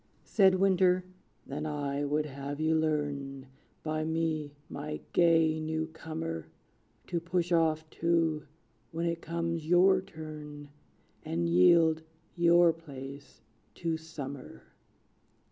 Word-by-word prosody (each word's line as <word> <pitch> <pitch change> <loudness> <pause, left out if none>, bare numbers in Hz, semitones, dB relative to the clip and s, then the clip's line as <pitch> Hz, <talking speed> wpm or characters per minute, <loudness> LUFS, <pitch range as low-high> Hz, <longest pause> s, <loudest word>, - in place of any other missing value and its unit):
Said 190 -3 +4
Winter, 185 -1 +3 0.4
"Then 150 +3 -4
I 145 -1 -2
would 150 +1 0
have 140 0 -6
you 160 +1 +2
learn, 145 -4 -1 0.4
By 155 0 -1
me, 160 -2 -1
my 150 +1 -5
gay 165 -2 +4
new 160 0 -2
comer, 155 - -5 0.6
To 175 - -2
push 175 +1 -1
off 160 -2 +2
too, 165 -2 +1 0.4
when 165 +1 -2
it 170 0 -1
comes 165 -1 -3
your 185 +2 +5
turn, 150 -4 -9 0.5
And 85 +1 -1
yield 160 - +5 0.3
your 170 -1 +5
place 140 -3 -10 0.3
to 165 -2 -1
Summer!" 140 - -8
160 Hz, 110 wpm, -30 LUFS, 145-170 Hz, 0.6 s, your